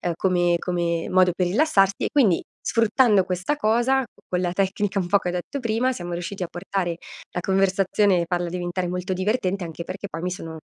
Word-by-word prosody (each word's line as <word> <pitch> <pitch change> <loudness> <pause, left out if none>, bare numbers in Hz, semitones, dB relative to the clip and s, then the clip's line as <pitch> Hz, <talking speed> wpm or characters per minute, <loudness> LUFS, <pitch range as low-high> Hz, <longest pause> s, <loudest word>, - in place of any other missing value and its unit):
come 175 -1 +2
come 170 -2 -1
modo 185 -1 +4
per 180 -1 +1
rilassarsi, 195 - +2
e - - -1
quindi, 225 - +4 0.3
sfruttando 230 -3 +3
questa 185 +10 -1
cosa 240 +3 +2 0.2
con 180 - 0
la 175 -1 -1
tecnica 195 +1 -1
un 180 - -2
po' 200 - +4
che 190 - -5
ho - - -1
detto 180 +10 -4
prima, 235 +2 0
siamo 175 -7 -5
riusciti 175 +3 -4
a 175 - -3
portare 175 0 -3 0.4
la - - -2
conversazione, 195 0 +2
farla 175 0 -1
diventare 180 0 -3
molto 180 +1 -3
divertente, 190 0 -1
anche 165 0 -6
perché 200 +3 -6
poi 165 -4 -7
mi 180 - -1
sono, 165 -3 -6
185 Hz, 190 wpm, -24 LUFS, 175-205 Hz, 0.4 s, modo